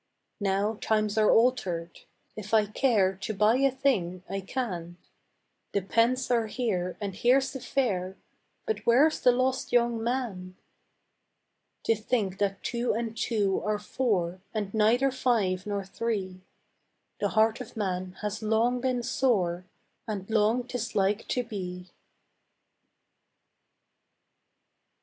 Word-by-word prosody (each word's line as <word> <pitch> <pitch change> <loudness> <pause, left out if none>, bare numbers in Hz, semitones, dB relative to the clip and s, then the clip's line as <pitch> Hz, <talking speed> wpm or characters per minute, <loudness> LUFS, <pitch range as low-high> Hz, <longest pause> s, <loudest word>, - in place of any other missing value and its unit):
Now 205 +2 0
times 215 -1 +1
are 215 - +4
altered: 185 -9 +1 0.4
if 215 +1 -2
I 215 -1 +5
care 210 -3 +2
To 210 +2 -4
buy 215 +4 +4
a 275 +1 +4
thing, 200 -10 0
I 195 +2 -3
can; 180 -6 -4 0.8
The 200 - +1
pence 245 +5 +1
are 230 -2 +2
here 195 -7 -2
and 200 -2 -4
here's 255 +6 +2
the 265 - -5
fair, 190 -9 -1 0.5
But 440 -2 -1
where's 280 +7 +5
the 250 - +5
lost 255 +1 0
young 235 -1 +2
man? 225 -7 -3 1.3
To - - +3
think 210 -3 -1
that 195 -1 -1
two 240 0 -1
and 230 -1 -3
two 205 -5 0
are 210 0 0
four 195 -5 -1
And 205 -2 -2
neither 230 +5 +3
five 210 -8 0
nor 200 -1 -2
three 190 -3 -3 0.8
The 205 - +1
heart 220 +1 +3
of - - -10
man 185 -3 -2
has 210 +1 -3
long 225 +3 +1
been 250 -2 0
sore 200 -9 +1 0.4
And 200 -3 -4
long 220 +3 +2
'tis 245 -3 -4
like 200 +1 +1
to 250 - 0
be. 180 -5 -7
215 Hz, 130 wpm, -28 LUFS, 195-245 Hz, 1.3 s, I